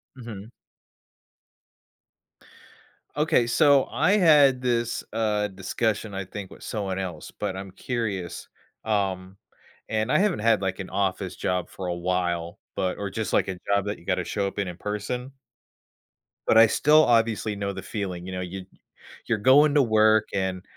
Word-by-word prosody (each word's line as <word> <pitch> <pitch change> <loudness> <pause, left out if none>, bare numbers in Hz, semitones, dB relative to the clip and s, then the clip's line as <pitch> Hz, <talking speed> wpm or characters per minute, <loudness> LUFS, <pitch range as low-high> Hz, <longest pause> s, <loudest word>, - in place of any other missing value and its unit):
Mhm. 115 -4 -9 2.6
Okay. 150 -5 +2
So 140 +2 +4
I 190 - +1
had 145 -8 +5
this, 120 -2 -1
uh, 105 -2 0
discussion, 105 +2 -2
I 95 0 -4
think, 100 0 -8
with - - -13
someone 100 -4 -3
else, 90 -5 -6
but 100 -2 -4
I'm 95 0 -7
curious, 100 -5 -4 0.4
um 95 -3 -2 0.5
and 110 +2 -1
I - - +4
haven't 195 -2 +1
had, 110 -2 +2
like, 95 0 -2
an 95 - -6
office 95 -1 -2
job 90 -1 -2
for 95 - -7
a 90 - -1
while, 85 0 -2 0.2
but 90 -1 -1
or 100 -1 -4
just, 110 +1 -3
like, - - +2
a 95 -2 -5
job 100 -1 +1
that 105 0 -4
you - - -19
gotta - - 0
show 100 -1 -2
up 100 - -7
in 100 -2 -1
in 90 -1 -7
person 105 +7 -4 1.2
but - - +5
I 115 0 +9
still 150 +7 +5
obviously 115 -2 +1
know 100 0 -3
the 95 - -6
feeling, 90 -1 -5
you 95 - -6
know, 90 - -4
you'd 90 +1 -7 0.6
you're 115 - +1
going 140 +7 +5
to 145 - +6
work 110 -2 +3
and, 95 -2 -2
105 Hz, 165 wpm, -25 LUFS, 95-115 Hz, 2.6 s, I